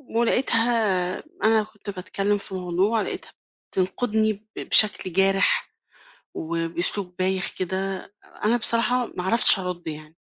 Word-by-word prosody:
ولقيتها 225 -6 +1 0.2
أنا 220 -1 +3
كنت 210 -1 -13
باتكلم 195 +2 -3
في 195 - -8
موضوع 185 +5 -1
لقيتها - - -6 0.4
بتنقدني 215 +3 -1
ب 215 +2 -15
بشكل 200 -4 +5
جارح 195 +1 +1 0.6
وبأسلوب 170 +3 -4
بايخ 185 +1 -1
كده. 190 +1 -5 0.3
أنا 230 +3 +2
بصراحة 240 +2 +2
ما 180 - -4
عرفتش 220 0 +7
أرد 180 -1 -7
يعني، 155 +1 -10
195 Hz, 115 wpm, -22 LUFS, 180-220 Hz, 0.6 s, عرفتش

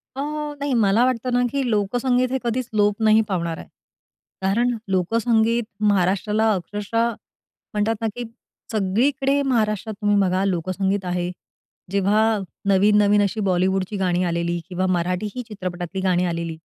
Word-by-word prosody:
अ, - - -6 0.4
नाही, 285 -2 -1
मला 210 +5 +4
वाटतं 255 0 -1
ना 245 0 +3
की 280 - 0
लोकसंगीत 245 +4 +1
हे 265 - +1
कधीच 240 +1 -2
लोप 205 +1 +2
नाही 215 +1 +6
पावणार 170 -3 -2
आहे. - - -10 0.7
कारण 230 +5 +1 0.2
लोकसंगीत 225 +4 +2 0.3
महाराष्ट्राला 205 +3 +2
अक्षरशः 210 +5 -1 0.6
म्हणतात 210 +2 +1
ना, 225 - 0
की 245 - -4 0.5
सगळीकडे 265 +8 +1
महाराष्ट्रात 220 -5 0
तुम्ही 205 0 +2
बघा 185 +1 +1
लोकसंगीत 190 +2 -1
आहे. 180 0 -2 0.6
जेव्हा 200 +2 +2 0.5
नवीन, 205 +2 +4
नवीन 205 0 +4
अशी 200 +2 -2
बॉलिवूडची 190 +1 0
गाणी 180 -1 +1
आलेली 170 0 -1
किंवा 185 +1 -1
मराठी 180 +4 -1
ही 250 - -3
चित्रपटातली 185 -2 -5
गाणी 180 -1 +2
आलेली, 170 -2 -3
205 Hz, 140 wpm, -22 LUFS, 185-230 Hz, 0.7 s, नाही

